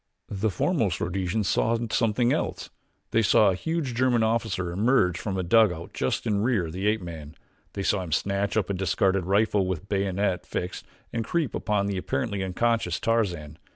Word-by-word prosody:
The 105 +2 -1
foremost 100 - 0
Rhodesians 95 +3 -1
saw 115 +5 +2
something 120 +2 +2
else - - -3 0.4
they 115 - +3
saw 105 -1 +5
a - - -1
huge 160 - -2
German 120 -1 +2
officer 110 -6 0
emerge 95 -2 +2
from 100 -3 -3
a 95 - -1
dugout 90 -3 +2
just 65 - -1
in 105 -3 +1
rear 115 -6 +1
of 80 - -7
the 95 +3 -2
ape 105 -2 +1
man. 80 -2 -8 0.4
They 100 - -3
saw 95 0 +1
him 90 -3 -7
snatch 100 +6 0
up 100 -2 0
a - - 0
discarded 95 0 +1
rifle 100 0 +2
with 95 +1 -4
bayonet 95 -2 0
fixed 90 - -4 0.3
and 115 - -1
creep 155 +4 -1
upon 105 -2 0
the 100 -1 -2
apparently 100 +1 -2
unconscious 95 -1 0
Tarzan. 90 -10 -1
100 Hz, 180 wpm, -26 LUFS, 90-115 Hz, 0.4 s, saw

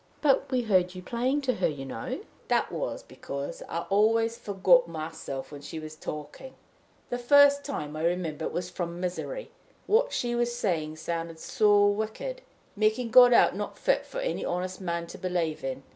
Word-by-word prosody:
"But 280 -1 +3
we 255 -1 +1
heard 185 -4 +2
you 185 - -8
playing 255 +7 0
to 260 -2 +1
her, - - +2
you 140 -3 -5
know." 125 -4 -5 0.3
"That - - +1
was - - -3
because 140 0 -6
I 170 - -2
always 225 +3 +3
forgot 210 +5 +3
myself 160 -4 -6
while 145 -1 -9
she 145 +3 -7
was 155 0 -8
talking. 150 - -8 0.6
The 245 - -1
first 285 +3 +6
time, 155 - -4
I 155 - -4
remember, 170 -3 -1
it - - -3
was 175 0 -3
from 175 -1 -4
misery 185 - -4 0.3
what 485 +4 +3
she 240 -1 -1
was 240 0 0
saying 160 -9 -1
sounded 165 +1 -4
so 205 +1 +3
wicked, 220 - -2 0.3
making 220 +3 +1
God 245 0 +9
out 235 - +5
not - - -5
fit - - +1
for - - -8
any - - -2
honest 185 +2 -3
man 170 -2 -2
to 170 - -10
believe 175 -4 -2
in. 135 0 -4
185 Hz, 180 wpm, -28 LUFS, 160-245 Hz, 0.6 s, God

